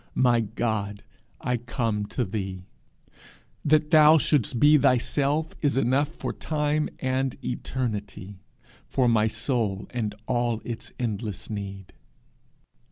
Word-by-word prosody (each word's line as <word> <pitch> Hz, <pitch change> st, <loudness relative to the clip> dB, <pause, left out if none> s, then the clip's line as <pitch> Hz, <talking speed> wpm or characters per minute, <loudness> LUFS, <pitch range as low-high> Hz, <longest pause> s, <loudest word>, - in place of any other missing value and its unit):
My 120 Hz, -2 st, +4 dB
God, 110 Hz, -2 st, -2 dB, 0.4 s
I 125 Hz, 0 st, -1 dB
come 115 Hz, -3 st, -2 dB
to 125 Hz, -, -2 dB
thee. 95 Hz, -2 st, -5 dB, 1.0 s
That 150 Hz, +1 st, +3 dB
thou 155 Hz, 0 st, +8 dB
shouldst 145 Hz, -4 st, +1 dB
be 150 Hz, +3 st, +7 dB
thyself 145 Hz, +4 st, +2 dB
is 145 Hz, -3 st, +1 dB
enough 135 Hz, +2 st, +2 dB
for -, -, -4 dB
time 150 Hz, 0 st, -1 dB
and 130 Hz, 0 st, -1 dB
eternity, 105 Hz, -6 st, -4 dB, 0.5 s
for 130 Hz, -2 st, +1 dB
my 110 Hz, -2 st, +4 dB
soul 110 Hz, -3 st, -1 dB
and 110 Hz, -4 st, -2 dB
all 120 Hz, -2 st, 0 dB
its 115 Hz, -2 st, -6 dB
endless 110 Hz, -3 st, -4 dB
need. 100 Hz, -2 st, -6 dB
120 Hz, 115 wpm, -26 LUFS, 105-140 Hz, 1.0 s, thou